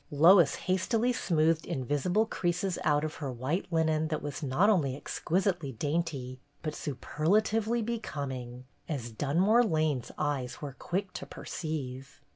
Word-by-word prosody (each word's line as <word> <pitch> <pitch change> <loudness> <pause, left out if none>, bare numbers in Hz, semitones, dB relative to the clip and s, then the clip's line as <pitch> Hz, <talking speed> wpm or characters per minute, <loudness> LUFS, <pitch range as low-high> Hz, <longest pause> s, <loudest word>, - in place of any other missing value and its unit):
Lois 165 +2 +6
hastily 220 +6 +1
smoothed 160 -5 +2
invisible 160 - 0
creases 180 -2 -1
out 150 0 +3
of 155 0 -4
her 140 -4 -4
white 130 +9 -2
linen 160 -1 +2
that 155 -1 -3
was 145 -2 -4
not 150 +7 +2
only 155 -11 +3
exquisitely 175 0 -1
dainty 140 -1 -2 0.2
but 155 -2 -2
superlatively 210 - 0
becoming, 130 - -4 0.2
as 125 -7 -3
Dun 145 +8 -1
more 220 +6 +5
Lane's 155 - 0
eyes 130 -4 -2
were 145 -3 -6
quick 185 +7 -3
to - - -6
perceive. 140 -4 -5
155 Hz, 135 wpm, -30 LUFS, 140-185 Hz, 0.2 s, Lois